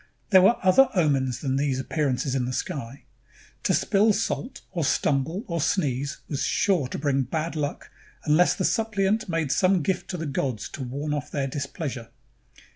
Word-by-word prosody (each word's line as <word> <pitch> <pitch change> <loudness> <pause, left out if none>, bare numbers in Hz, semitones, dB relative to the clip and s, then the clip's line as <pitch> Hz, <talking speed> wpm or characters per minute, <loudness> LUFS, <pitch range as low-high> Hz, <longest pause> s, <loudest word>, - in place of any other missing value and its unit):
There 190 -2 +8
were 195 +6 +5
other 215 +9 +6
omens 135 -8 +1
than 135 -2 0
these 140 -2 0
appear 145 +3 -1
ances 130 +1 -1
in 130 -2 0
the 125 - -3
sky. 130 0 -5 0.6
To - - +1
spill 210 +1 +3
salt 245 +5 -3
or 175 -4 -2
stumble 150 - 0
or 170 -6 -2
sneeze 140 -5 0
was 140 - -3
sure 180 -10 +1
to - - -5
bring 140 -2 +1
bad 155 +6 -3
luck 145 -1 -4 0.3
unless 155 +4 +4
the 185 - -1
suppliant 215 -2 0
made 165 -4 -1
some 185 -1 +3
gift 185 +3 -2
to 180 - -3
the 165 - -4
gods 125 -6 -2
to 140 - -8
ward 140 +4 -3
off 145 -3 -3
their 140 -2 -2
displeasure. 140 -3 -5
150 Hz, 180 wpm, -25 LUFS, 135-185 Hz, 0.6 s, There